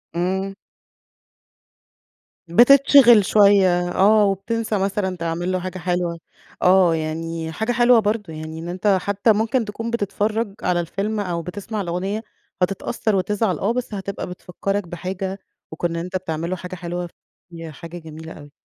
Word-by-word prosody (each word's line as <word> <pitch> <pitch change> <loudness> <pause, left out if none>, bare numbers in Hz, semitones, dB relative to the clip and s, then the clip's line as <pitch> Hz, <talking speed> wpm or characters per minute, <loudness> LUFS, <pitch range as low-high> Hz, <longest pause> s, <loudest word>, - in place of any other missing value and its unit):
إمم. 190 +3 -1 1.9
بتتشغل 245 +2 +7
شوية 190 -4 +4
آه، 210 +3 +4
وبتنسى 215 +3 -1
مثلًا 190 -1 -1
تعمل 170 +2 -2
له 185 - 0
حاجة 185 +1 -5
حلوة 175 -1 -2 0.4
آه، 180 -2 +5
يعني 160 +1 -4
حاجة 220 +8 -2
حلوة 240 0 +5
برضه 210 -5 -2
يعني 155 +1 -7
إن 170 +1 -6
أنت 190 +2 +2
حتى 200 +3 +2
ممكن 225 +3 0
تكون 225 +2 -5
بتتفرج 215 -1 -1
على 180 -1 +1
الفيلم 200 +6 -2
أو 175 -4 -2
بتسمع 205 +5 -5
الأغنية، 190 +5 -3 0.4
هتتأثر 195 +3 0
وتزعل 195 +1 0
آه، 205 +4 0
بس 245 -3 -4
هتبقى 200 0 -5
بتفكّرك 185 +2 -4
بحاجة 190 +3 -5 0.3
وكون 165 +2 -2
إن 170 - -5
أنت 180 +2 -5
بتعمل 165 -2 -4
له 185 - -1
حاجة 180 0 -7
حلوة، 175 0 -5 0.4
ياه، 165 -1 -8
حاجة 170 +4 -9
جميلة 160 0 -10
أوي. 145 -1 -13
185 Hz, 145 wpm, -21 LUFS, 175-210 Hz, 1.9 s, بتتشغل